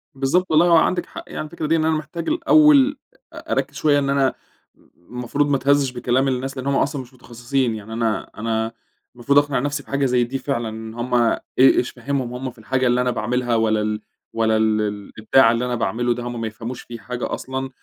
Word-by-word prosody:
بالضبط 140 +8 +1
والله 160 +2 +5
هو 170 - +5
عندِك 175 +2 +1
حق - - -9
يعني - - -5
الفكرة 155 +1 -6
دي، 165 - +3
إن 160 -1 +1
أنا 160 0 +2
محتاج 155 +2 -6
الأول 300 -3 +5 0.4
أ - - -9
أركز - - -1
شوية 145 -2 +3
إن 140 -1 -1
أنا 135 -2 +2 0.6
م 90 +8 -16
المفروض 140 +4 0
ما 145 - +3
اتهزش 140 0 +2
بكلام 125 +2 0
الناس 135 +1 -2
لأن 130 +1 -4
هم 140 - +1
أصلًا 140 0 0
مش 130 0 -14
متخصصين. 120 0 -2
يعني 110 +1 -8
أنا 115 -1 -1
أنا 110 0 -1 0.4
المفروض 140 +4 +3
أقنع 145 -2 0
نفسي 145 +2 -2
بحاجة 140 0 -1
زي 125 -1 +2
دي 125 +3 -3
فعلًا، 130 -4 -2
إن 110 0 -8
هم 120 +2 -5
إي 120 -2 +3 0.2
إيش 130 -1 +5
فهمهم 135 -3 -3
هم 130 +1 -5
في 120 - -26
الحاجة 130 +3 0
اللي 125 +1 +2
أنا 125 0 +1
باعملها، 120 +1 -1
والّا 110 -1 +2
ال 105 0 -2 0.3
والّا 110 -1 +2
ال 110 -1 +2
الإبداع 105 +3 +2
اللي 120 +1 -1
أنا 125 -1 -1
باعمله 120 +2 0
ده 120 - -6
هم 120 -1 -5
ما 115 - -2
يفهموش 115 +3 -7
فيه 120 - -9
حاجة 125 +1 -5
أصلًا. 130 0 -4
125 Hz, 215 wpm, -21 LUFS, 115-140 Hz, 0.6 s, والله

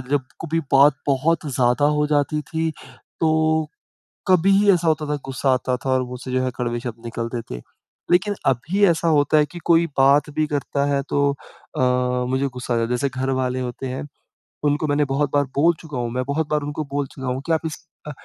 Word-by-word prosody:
जब 145 -1 +2 0.2
कभी 165 0 -1
बात 140 +2 +6
बहुत 150 +4 +1
ज़्यादा 130 0 +1
हो 150 - +2
जाती 150 +1 +1
थी, 160 +1 -2 0.5
तो 160 -1 +2 0.6
कभी 185 +1 +4
ही 205 0 +5
ऐसा 175 -2 +1
होता 155 -1 +1
था 150 - 0
गुस्सा 135 0 -1
आता 130 0 -1
था 135 - 0
और 130 0 +2
मुँह 125 0 -7
से 130 - -5
जो 130 0 +1
है 130 - 0
कड़वे 120 -1 -2
शब्द 115 -1 -7
निकलते 115 +1 -4
थे। - - -5 0.5
लेकिन 185 +4 +3
अभी 165 - +2
ऐसा 170 -1 +2
होता 150 -1 +3
है 150 - +3
कि, 175 - -10
कोई 170 0 +4
बात 140 +3 +4
भी 155 - +2
करता 140 -1 -1
है 140 - +1
तो 140 0 +2
अ, 140 - -11 0.5
मुझे 130 +2 0
गुस्सा 125 -1 -3
आ - - +1
जाता 115 0 0
है। - - -9
जैसे 140 - 0
घर 130 0 0
वाले 130 0 -1
होते 125 +1 -5
हैं, 130 +3 -4 0.6
उनको 145 +1 +1
मैंने 145 +1 +2
बहुत 140 +1 0
बार 145 0 +3
बोल 165 +4 +4
चुका 150 -5 -7
हूँ, 120 -1 -2
मैं 130 0 -1
बहुत 150 +2 -1
बार 150 -1 +1
उनको 145 +2 -4
बोल 145 0 -1
चूका 135 -1 -7
हूँ 125 +1 -2
कि 170 - -2
आप 160 - +1
इस 160 +2 -6 0.2
अ, - - -4
145 Hz, 220 wpm, -22 LUFS, 130-155 Hz, 0.6 s, बात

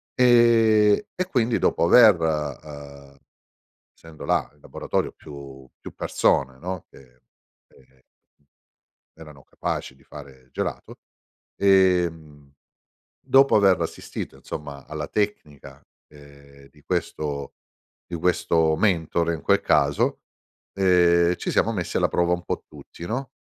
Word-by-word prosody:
Ehm, 115 -4 +4 0.2
e 185 - -2
quindi 120 -5 +1
dopo - - +1
aver, 110 -2 +7
uhm 70 -2 -5 0.8
essendo 80 -2 -12
là - - 0
in 75 - -29
laboratorio - - -3
più 70 -3 -12
più - - -11
persone, 65 -1 0
no, 90 0 -6
che 60 -1 -20 0.5
che 65 -1 -25 1.2
erano 75 -4 -14
capaci 65 - -5
di 65 - -25
fare 65 -3 -14
gelato. - - -5 0.6
Ehm, 85 -7 +1 0.7
dopo 135 +1 +4
aver 95 -3 +4
assistito - - -6
insomma 70 -2 -8
alla 75 -1 -5
tecnica, 100 -9 -4 0.3
ehm, 70 -1 -18
di - - -23
questo 70 -2 -4 0.5
di 85 - -6
questo 80 -2 +1
mentore 85 -3 0
in 80 - -8
quel - - +2
caso, 70 0 +1 0.5
ehm, 90 -2 +3
ci - - -4
siamo 115 - +1
messi 90 -6 -4
alla - - +2
prova 85 0 0
un 90 - -6
po' - - -4
tutti, 85 - -12
no, 130 +4 -4
80 Hz, 120 wpm, -23 LUFS, 70-95 Hz, 1.2 s, aver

